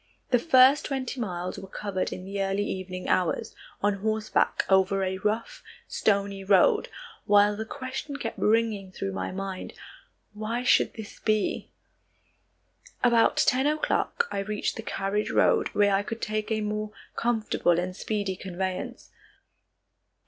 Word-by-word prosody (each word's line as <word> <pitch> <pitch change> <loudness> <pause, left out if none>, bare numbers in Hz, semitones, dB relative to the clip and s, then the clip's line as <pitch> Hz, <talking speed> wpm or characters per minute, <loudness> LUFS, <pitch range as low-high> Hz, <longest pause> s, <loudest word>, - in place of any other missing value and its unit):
The 245 - +5
first 265 0 +5
twenty 265 -2 -3
miles 180 -5 -3
were 195 - -9
covered 190 -1 -3
in 185 - -6
the 200 +1 -3
early 195 +1 0
evening 185 -2 -5
hours, 180 -3 0 0.3
on 205 -1 +2
horseback 215 +1 0
over 190 0 +3
a 190 0 -2
rough, 215 +3 -2 0.3
stony 200 -1 0
road, 190 -1 +4 0.4
while 205 0 +5
the 220 +1 -4
question 270 +2 -5
kept 225 -5 -5
ringing 215 -3 +1
through 195 +1 -4
my 190 - -3
mind, 190 0 -5 0.6
"Why 220 +3 -3
should 255 - +3
this 220 -2 -9
be?" 215 -1 0 1.3
About 235 -2 +4
ten 265 -1 +3
o'clock 310 +9 0
I - - -2
reached 210 +1 -2
the - - -5
carriage 205 -1 -2
road - - +3
where 205 -1 +3
I 195 - +3
could 225 +2 -5
take 215 0 -2
a 215 0 +1
more 210 0 -3 0.2
comfortable 220 -7 +1
and 180 +1 -3
speedy 205 -2 -2
conveyance. 185 0 -5
205 Hz, 140 wpm, -27 LUFS, 195-225 Hz, 1.3 s, The